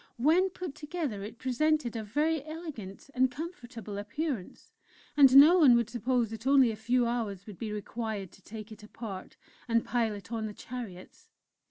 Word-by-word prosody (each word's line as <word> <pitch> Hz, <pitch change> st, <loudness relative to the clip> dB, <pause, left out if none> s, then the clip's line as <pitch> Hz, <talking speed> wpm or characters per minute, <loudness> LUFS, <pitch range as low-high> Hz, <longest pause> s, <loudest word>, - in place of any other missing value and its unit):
When 325 Hz, +10 st, +4 dB
put 360 Hz, -4 st, -6 dB
together 295 Hz, -, -4 dB
it 210 Hz, +4 st, -8 dB
presented 260 Hz, 0 st, 0 dB
a 225 Hz, -, -3 dB
very 295 Hz, +8 st, 0 dB
elegant 295 Hz, -, -8 dB
and 260 Hz, +1 st, +3 dB
comfortable 245 Hz, -, -7 dB
appearance, 230 Hz, -, -4 dB, 0.4 s
and 270 Hz, -3 st, +7 dB
no 310 Hz, +6 st, +9 dB
one 270 Hz, -7 st, +7 dB
would 235 Hz, -1 st, +1 dB
suppose 240 Hz, -1 st, 0 dB
that 225 Hz, +3 st, -6 dB
only 270 Hz, -4 st, +6 dB
a -, -, -5 dB
few 240 Hz, +3 st, +1 dB
hours 220 Hz, -5 st, -2 dB
would 210 Hz, -4 st, -11 dB
be 220 Hz, -2 st, -4 dB
required 210 Hz, -2 st, -4 dB
to 195 Hz, -, -19 dB
take 215 Hz, +2 st, -9 dB
it 215 Hz, -, -11 dB
apart 210 Hz, -3 st, -8 dB, 0.3 s
and 230 Hz, -1 st, +2 dB
pile 225 Hz, -2 st, 0 dB
it 205 Hz, +3 st, -11 dB
on 225 Hz, -2 st, -2 dB
the 210 Hz, -, -8 dB
chariots. 225 Hz, -8 st, -9 dB
235 Hz, 175 wpm, -30 LUFS, 215-280 Hz, 0.4 s, no